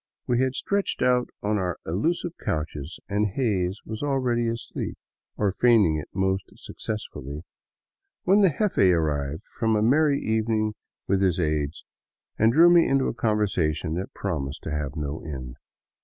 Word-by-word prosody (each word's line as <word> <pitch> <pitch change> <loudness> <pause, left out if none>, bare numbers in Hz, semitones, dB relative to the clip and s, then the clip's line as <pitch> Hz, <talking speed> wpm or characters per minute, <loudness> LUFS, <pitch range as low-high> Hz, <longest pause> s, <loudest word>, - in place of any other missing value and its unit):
We 120 0 +1
had 130 0 0
stretched 200 -1 -1
out 125 -1 +3
on 105 0 +1
our 90 -2 -2
elusive 165 - -1
couches, 75 0 -3
and 105 +1 +1
Hays 100 -4 -1
was 110 0 -6
already 130 -5 +1
asleep 115 0 -4 0.2
— - - -55
or 100 -2 +2
feigning 105 -7 +4
it 75 - -6
most 95 0 -1
successfully, 75 -8 -6 0.4
— - - -60
when 195 +3 +5
the 195 - +6
jefe 210 -3 0
arrived 80 -3 +2 0.2
from 110 -2 +2
a 105 - +2
merry 140 +4 +4
evening 110 -1 0 0.3
with 100 0 +2
his 90 -3 +2
aids 75 -3 -1 0.5
and 110 +1 +5
drew 170 +6 +7
me 170 -1 +6
into 135 -1 +2
a - - -3
conversation 95 -9 0
that 90 +3 -4
promised 75 -7 -3
to - - -4
have 75 -1 -3
no 75 -1 -4
end. 65 -5 -7
105 Hz, 160 wpm, -25 LUFS, 80-120 Hz, 0.5 s, drew